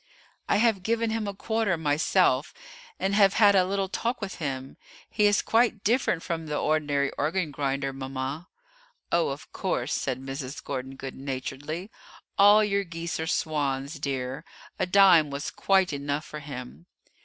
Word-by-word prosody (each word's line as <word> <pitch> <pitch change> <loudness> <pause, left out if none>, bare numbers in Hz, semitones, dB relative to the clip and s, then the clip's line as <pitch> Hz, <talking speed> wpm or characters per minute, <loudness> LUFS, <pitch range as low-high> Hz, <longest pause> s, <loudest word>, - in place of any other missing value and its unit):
"I - - +4
have 220 -3 +3
given 230 +3 0
him 220 -2 -2
a 200 - -3
quarter 220 -4 0
myself, 150 -1 +2 0.4
and 195 - 0
have 200 -1 +5
had 205 -2 +6
a 185 -2 +4
little 195 0 -1
talk 235 +6 -2
with 200 -3 -5
him; 135 -4 -4 0.3
he 210 -1 +2
is 205 -1 +3
quite 225 -2 +2
different 225 -7 +1
from 165 -2 -3
the 150 -1 -2
ordinary 145 -2 +1
organ 160 +2 0
grinder, 135 -1 -2
mama." 135 +4 -5 0.6
"Oh, 170 -1 +2
of 140 +1 -7
course," 150 -8 -2
said 130 -2 -2
Mrs. 135 0 -6
Gordon 135 -1 -5
good 135 0 -7
naturedly; 140 +7 -5 0.4
"all 205 +2 +7
your 200 -1 +1
geese 170 -2 -5
are 160 - -2
swans, 145 -2 -1
dear; 135 -2 -3 0.4
a - - +1
dime 180 -5 +6
was 140 +1 -4
quite 190 -4 +2
enough 145 +1 -3
for 150 - -7
him." 140 +3 -9
155 Hz, 160 wpm, -27 LUFS, 140-195 Hz, 0.6 s, all